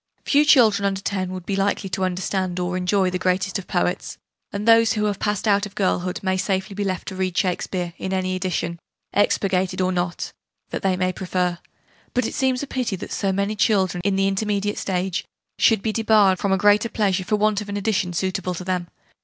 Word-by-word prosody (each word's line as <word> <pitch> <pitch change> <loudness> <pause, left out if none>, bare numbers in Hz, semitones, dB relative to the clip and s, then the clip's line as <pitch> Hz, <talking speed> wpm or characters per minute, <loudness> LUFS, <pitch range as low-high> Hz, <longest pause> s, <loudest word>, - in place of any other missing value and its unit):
Few 295 +1 +4
children 225 -9 +5
under 195 -1 0
10 190 -2 -2
would 185 -1 -6
be 200 - -1
likely 195 0 0
to 190 - -1
understand 185 0 -1
or 180 0 -1
enjoy 185 +1 +1
the 180 - -2
greatest 185 +2 0
of 190 - -10
poets: 180 -1 -1 0.3
and 205 +2 -4
those, 230 -1 +6
who 210 -1 0
have 205 -2 -1
passed 210 0 -1
out 205 0 +3
of 205 - -18
girlhood, 185 -2 0
may 190 -1 +1
safely 190 +1 -1
be 205 +1 -2
left 185 -2 -3
to 190 - -7
read 185 -2 -2
Shakespeare, 180 -1 -1
in 190 - -3
any 185 -1 0
edition, 175 -2 -2 0.3
'expurgated' 190 -2 +1
or 185 0 +2
not, 175 -1 -2 0.4
that - - -3
they 190 -1 +1
may 185 0 0
prefer: 180 -1 -1 0.6
but 250 - +2
it - - -3
seems 260 0 0
a - - -2
pity 250 -6 -2
that 190 - -8
so 195 -2 0
many 200 +2 -1
children, 190 -4 +2
in 200 -1 +1
the 195 0 +2
intermediate 205 +1 -1
stage, 185 -1 -1 0.4
should 220 -4 +4
be 220 - 0
debarred 215 -4 +4
from 200 - 0
a 190 - +3
great 205 +3 +3
pleasure 195 -3 +1
for 210 - 0
want 210 0 +1
of 210 - -8
an 205 - -3
edition 195 -3 0
suitable 185 0 -2
to 180 - -6
them. 180 -1 -2
190 Hz, 210 wpm, -23 LUFS, 185-205 Hz, 0.6 s, those